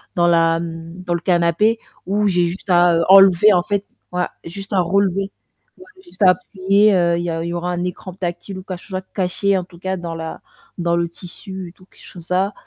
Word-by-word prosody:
dans 175 Hz, -1 st, +3 dB
la, 165 Hz, -1 st, +3 dB
mmh 165 Hz, +1 st, -7 dB
dans 175 Hz, -, -1 dB
le 170 Hz, -, -2 dB
canapé 180 Hz, +6 st, +2 dB, 0.3 s
où 205 Hz, +2 st, +1 dB
j'ai 175 Hz, -2 st, +2 dB
juste 185 Hz, +3 st, -7 dB
à, 175 Hz, -1 st, +5 dB
heu, 165 Hz, -, +2 dB
enlever 195 Hz, +1 st, +7 dB
en 175 Hz, -1 st, +3 dB
fait, 200 Hz, +1 st, -2 dB, 0.3 s
voilà, 180 Hz, 0 st, -1 dB
j'ai -, -, -8 dB
juste 195 Hz, +3 st, -8 dB
à 190 Hz, -, +3 dB
relever, 195 Hz, +2 st, 0 dB, 0.5 s
ouais 370 Hz, -, -14 dB, 0.2 s
juste 350 Hz, -, -19 dB
à 185 Hz, -, +8 dB
appuyer, 195 Hz, +3 st, +2 dB
heu, 170 Hz, -1 st, +2 dB
il 170 Hz, -, -2 dB
y 175 Hz, -, -2 dB
a 165 Hz, 0 st, -2 dB
il -, -, -4 dB
y -, -, -3 dB
aura 175 Hz, +1 st, -2 dB
un 175 Hz, 0 st, -2 dB
écran 180 Hz, +1 st, -6 dB
tactile 180 Hz, +1 st, -5 dB
ou -, -, -10 dB
quelque 185 Hz, -2 st, -7 dB
chose 190 Hz, -2 st, -6 dB
à -, -, -4 dB
cacher 190 Hz, +1 st, -1 dB
en 185 Hz, -, -2 dB
tout 175 Hz, -1 st, -17 dB
cas 190 Hz, +1 st, -2 dB
dans 170 Hz, -2 st, -6 dB
la 160 Hz, 0 st, -6 dB, 0.4 s
dans 170 Hz, -1 st, 0 dB
le 170 Hz, 0 st, 0 dB
tissu 185 Hz, +1 st, -9 dB
et -, -, -14 dB
tout, 185 Hz, -, -21 dB
quelque -, -, -24 dB
chose -, -, -13 dB
comme 175 Hz, -, -10 dB
ça, 185 Hz, +4 st, 0 dB
180 Hz, 245 wpm, -20 LUFS, 170-195 Hz, 0.5 s, à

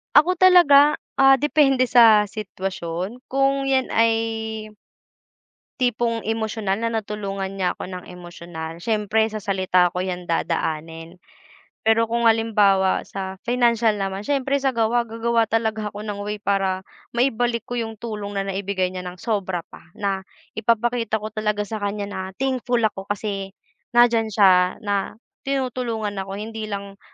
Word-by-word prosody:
Ako 340 Hz, +5 st, +6 dB
talaga, 315 Hz, -6 st, +6 dB, 0.2 s
ah, 270 Hz, -1 st, +6 dB
depende 270 Hz, -4 st, +3 dB
sa 225 Hz, -4 st, +6 dB
sitwasyon 190 Hz, +1 st, -5 dB
kung 275 Hz, 0 st, +2 dB
'yan 265 Hz, -1 st, +1 dB
ay 225 Hz, -1 st, 0 dB, 1.0 s
tipong 235 Hz, -2 st, 0 dB
emosyonal 220 Hz, -2 st, -1 dB
na 230 Hz, -, +1 dB
natulungan 200 Hz, -3 st, -3 dB
niya 185 Hz, -2 st, -1 dB
'ko -, -, -6 dB
ng 180 Hz, -1 st, -7 dB
emosyonal. 170 Hz, -2 st, -8 dB
Siyempre 220 Hz, 0 st, +1 dB
sa 215 Hz, -, -4 dB
salita 185 Hz, -3 st, +2 dB
ko 180 Hz, -, -2 dB
'yan 180 Hz, -1 st, -5 dB
dadaanin. 165 Hz, 0 st, -2 dB, 0.7 s
Pero 225 Hz, +1 st, +5 dB
kung 230 Hz, +1 st, +1 dB
halimbawa 205 Hz, -4 st, +3 dB
sa 190 Hz, -1 st, -6 dB
financial 235 Hz, -3 st, +3 dB
naman 195 Hz, -1 st, -3 dB
siyempre 275 Hz, 0 st, +1 dB
sa 265 Hz, -2 st, 0 dB
gawa, 235 Hz, +1 st, +1 dB
gagawa 230 Hz, 0 st, 0 dB
talaga 220 Hz, -1 st, -1 dB
ako 210 Hz, 0 st, -7 dB
ng 205 Hz, -1 st, -5 dB
way 205 Hz, +1 st, -3 dB
para 195 Hz, -2 st, 0 dB, 0.3 s
maibalik 240 Hz, -2 st, +1 dB
ko 245 Hz, 0 st, -4 dB
yung 225 Hz, -1 st, -4 dB
tulong 210 Hz, -2 st, -6 dB
na 195 Hz, -, 0 dB
naibigay 195 Hz, -1 st, -2 dB
niya 180 Hz, -1 st, -6 dB
ng 180 Hz, -, -7 dB
sobra 190 Hz, -4 st, -2 dB
pa. -, -, -12 dB, 0.2 s
Na 195 Hz, -1 st, -1 dB, 0.3 s
ipapakita 230 Hz, +1 st, 0 dB
ko 215 Hz, 0 st, -4 dB
talaga 210 Hz, -1 st, -1 dB
sa 215 Hz, +1 st, -5 dB
kaniya 205 Hz, 0 st, -3 dB
na -, -, -5 dB, 0.2 s
thankful 250 Hz, -2 st, -1 dB
ako 195 Hz, -3 st, -1 dB
kasi 200 Hz, -1 st, -4 dB, 0.4 s
nandiyan 235 Hz, -2 st, +5 dB
siya 185 Hz, -3 st, +4 dB
na 200 Hz, -1 st, -1 dB, 0.3 s
tinutulungan 240 Hz, -6 st, -2 dB
ako. 195 Hz, 0 st, -5 dB
Hindi 220 Hz, +1 st, -6 dB
lang 200 Hz, -1 st, -6 dB
215 Hz, 145 wpm, -22 LUFS, 195-235 Hz, 1.0 s, Ako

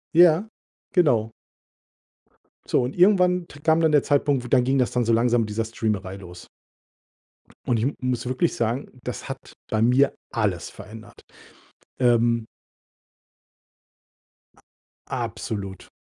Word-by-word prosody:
Ja, 175 Hz, +4 st, +6 dB, 0.5 s
genau. 120 Hz, -, +3 dB, 1.4 s
So, -, -, +2 dB
und 125 Hz, +2 st, -3 dB
irgendwann 180 Hz, -2 st, +4 dB
t 145 Hz, -, -14 dB
kam 160 Hz, +2 st, +3 dB
dann 160 Hz, -1 st, +3 dB
der 150 Hz, -1 st, +5 dB
Zeitpunkt, 140 Hz, -4 st, +1 dB
dann 125 Hz, -2 st, +5 dB
ging 135 Hz, +2 st, +1 dB
das 125 Hz, -, +1 dB
dann 120 Hz, -2 st, 0 dB
so 115 Hz, -, +2 dB
langsam 120 Hz, +1 st, +3 dB
mit 110 Hz, -, -3 dB
dieser 110 Hz, +2 st, -2 dB
Streamerei 105 Hz, -4 st, -3 dB
los. 90 Hz, -2 st, -12 dB, 1.2 s
Und 120 Hz, -, +1 dB
ich 110 Hz, -, -1 dB
m 140 Hz, -, -1 dB
muss 125 Hz, -1 st, -2 dB
wirklich 130 Hz, +7 st, 0 dB
sagen, 120 Hz, +4 st, -2 dB
das -, -, -6 dB
hat -, -, -8 dB, 0.2 s
bei 110 Hz, -, 0 dB
mir 125 Hz, +4 st, +4 dB, 0.2 s
alles 105 Hz, -8 st, -1 dB
verändert, 110 Hz, 0 st, -13 dB, 0.8 s
ähm. 120 Hz, -2 st, +2 dB, 2.6 s
Absolut. 100 Hz, -4 st, -5 dB
125 Hz, 125 wpm, -24 LUFS, 110-145 Hz, 2.6 s, Ja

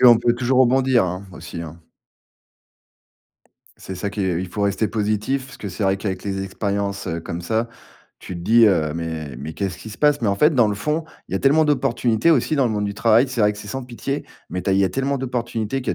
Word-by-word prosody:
Qu'on 120 Hz, -2 st, +8 dB
peut 120 Hz, 0 st, +2 dB
toujours 130 Hz, +1 st, +2 dB
rebondir, 130 Hz, -3 st, +4 dB
hein, 90 Hz, +2 st, -4 dB
aussi 85 Hz, -1 st, -8 dB
hein? 85 Hz, +1 st, -9 dB, 1.9 s
C'est 95 Hz, -, -8 dB
ça 100 Hz, +3 st, -3 dB
qui 105 Hz, -, -5 dB
est 90 Hz, -3 st, 0 dB
il 95 Hz, -, -4 dB
faut 100 Hz, +3 st, -3 dB
rester 100 Hz, +2 st, +1 dB
positif, 110 Hz, +5 st, -1 dB
parce 135 Hz, -, -12 dB
que 100 Hz, -, -6 dB
c'est 95 Hz, +4 st, -5 dB
vrai 95 Hz, 0 st, +2 dB
qu'avec 95 Hz, -2 st, -4 dB
les 95 Hz, -1 st, -2 dB
expériences, 100 Hz, 0 st, -2 dB
heu, 85 Hz, 0 st, -2 dB
comme 85 Hz, +1 st, -5 dB
ça, 110 Hz, +7 st, -1 dB, 0.5 s
tu 90 Hz, -, -8 dB
te -, -, -7 dB
dis 115 Hz, +5 st, +5 dB
heu: 80 Hz, -6 st, +2 dB
«Mais, 80 Hz, -4 st, -4 dB
mais 75 Hz, +5 st, -7 dB
qu'est-ce 95 Hz, -3 st, -3 dB
qui -, -, -9 dB
se -, -, -9 dB
passe?» 150 Hz, -1 st, +3 dB
Mais, 105 Hz, -, +2 dB
en 100 Hz, -, +1 dB
fait, 150 Hz, +6 st, +4 dB
dans 120 Hz, -4 st, +4 dB
le 105 Hz, -, -1 dB
fond, 150 Hz, +10 st, -1 dB, 0.2 s
il -, -, -11 dB
y -, -, 0 dB
a -, -, +1 dB
tellement 150 Hz, +3 st, +4 dB
d'opportunités 135 Hz, -1 st, +2 dB
aussi 155 Hz, 0 st, +2 dB
dans 135 Hz, -4 st, +3 dB
le 115 Hz, -, -1 dB
monde 105 Hz, -1 st, -1 dB
du 100 Hz, 0 st, -3 dB
travail, 115 Hz, +4 st, +4 dB
c'est 130 Hz, -2 st, -3 dB
vrai 105 Hz, 0 st, +4 dB
que 105 Hz, -, -11 dB
c'est -, -, -9 dB
sans 135 Hz, -1 st, -4 dB
pitié, 130 Hz, +4 st, -4 dB, 0.3 s
mais 90 Hz, +2 st, -3 dB
tu 100 Hz, -, 0 dB
as -, -, +3 dB
il -, -, +3 dB
y 100 Hz, -, +4 dB
a -, -, +2 dB
tellement 135 Hz, +7 st, -1 dB
d'opportunités 120 Hz, -1 st, -2 dB
qu'il 125 Hz, -, -2 dB
y -, -, -1 dB
105 Hz, 255 wpm, -22 LUFS, 95-125 Hz, 1.9 s, Qu'on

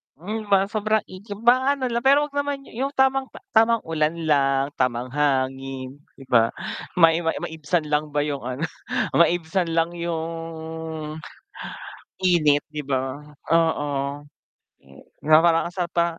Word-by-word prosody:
Hmm, 210 Hz, +7 st, -5 dB
ma 195 Hz, -1 st, +4 dB
sobrang 215 Hz, 0 st, +1 dB
igib 200 Hz, +2 st, -9 dB
maano 260 Hz, +2 st, +4 dB
la 235 Hz, -, +1 dB
pero 280 Hz, +3 st, +5 dB
wag 295 Hz, -, -14 dB
naman 285 Hz, -1 st, -2 dB
yu -, -, -15 dB
yung 275 Hz, +1 st, -1 dB
tamang 265 Hz, 0 st, +3 dB
ta -, -, -13 dB, 0.2 s
tamang 225 Hz, 0 st, +4 dB
ulan 160 Hz, 0 st, 0 dB
lang, 135 Hz, -1 st, +2 dB
tamang 125 Hz, 0 st, 0 dB
hangin, 135 Hz, -1 st, -1 dB, 0.2 s
'di 135 Hz, -, -12 dB
ba? 115 Hz, -2 st, +5 dB, 0.5 s
Ma 165 Hz, -1 st, +7 dB
i 165 Hz, -, 0 dB
-ma 165 Hz, -1 st, 0 dB
maibsan 160 Hz, +1 st, -2 dB
lang 150 Hz, 0 st, +1 dB
ba 145 Hz, -, +3 dB
yung 145 Hz, -2 st, -3 dB
ano, 130 Hz, +5 st, -4 dB, 0.5 s
maibsan 170 Hz, +1 st, +2 dB
lang 165 Hz, +1 st, +2 dB
yung 170 Hz, -1 st, -3 dB, 1.9 s
init, 155 Hz, -6 st, +3 dB
'di 150 Hz, -1 st, -4 dB
ba? 135 Hz, +1 st, -2 dB, 0.3 s
Oo, 165 Hz, -3 st, +2 dB, 1.0 s
eh, 70 Hz, 0 st, -17 dB, 0.2 s
na 155 Hz, +1 st, +7 dB
parang 165 Hz, -1 st, +3 dB
ang -, -, -23 dB
sarap 175 Hz, -2 st, -3 dB
pa 170 Hz, -1 st, +4 dB
165 Hz, 150 wpm, -23 LUFS, 145-205 Hz, 1.9 s, Ma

